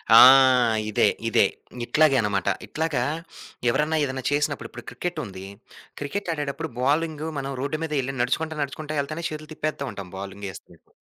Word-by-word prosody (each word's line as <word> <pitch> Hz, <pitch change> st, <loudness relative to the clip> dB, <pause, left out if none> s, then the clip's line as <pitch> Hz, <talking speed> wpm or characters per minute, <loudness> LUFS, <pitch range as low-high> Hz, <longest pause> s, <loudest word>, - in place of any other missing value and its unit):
ఆ! -, -, +11 dB, 0.7 s
ఇదే, 105 Hz, -, +3 dB, 0.2 s
ఇదే. -, -, +5 dB, 0.4 s
ఇట్లాగే 155 Hz, +1 st, +4 dB
అన్నమాట. 100 Hz, -4 st, 0 dB, 0.2 s
ఇట్లాగా 160 Hz, -1 st, -1 dB, 0.7 s
ఎవరన్నా, 150 Hz, +6 st, +1 dB
ఏదన్నా 130 Hz, -2 st, -3 dB
చేసినప్పుడు, 145 Hz, -5 st, 0 dB
ఇప్పుడు 120 Hz, -, -11 dB
క్రికెట్టుంది. 150 Hz, -, -5 dB, 0.6 s
క్రికెటాడేటప్పుడు 160 Hz, -2 st, -3 dB
బౌలింగు 155 Hz, +3 st, 0 dB
మనం 135 Hz, 0 st, -4 dB
రోడ్ 145 Hz, +3 st, -1 dB
మీద 160 Hz, -, -7 dB
వెళ్లి 135 Hz, +1 st, -3 dB
నడుచుకుంటా, 155 Hz, +5 st, -1 dB
నడుచుకుంటా 150 Hz, +1 st, -3 dB
ఏల్తానే 155 Hz, +4 st, -5 dB
చేతులు 155 Hz, 0 st, -8 dB
తిప్పేత్తా 155 Hz, -2 st, -3 dB
ఉంటాం 95 Hz, -2 st, -8 dB
బాలింగ్ 100 Hz, +1 st, -6 dB
ఏస్తున్నట్టు. -, -, -15 dB
145 Hz, 135 wpm, -25 LUFS, 125-155 Hz, 0.7 s, ఆ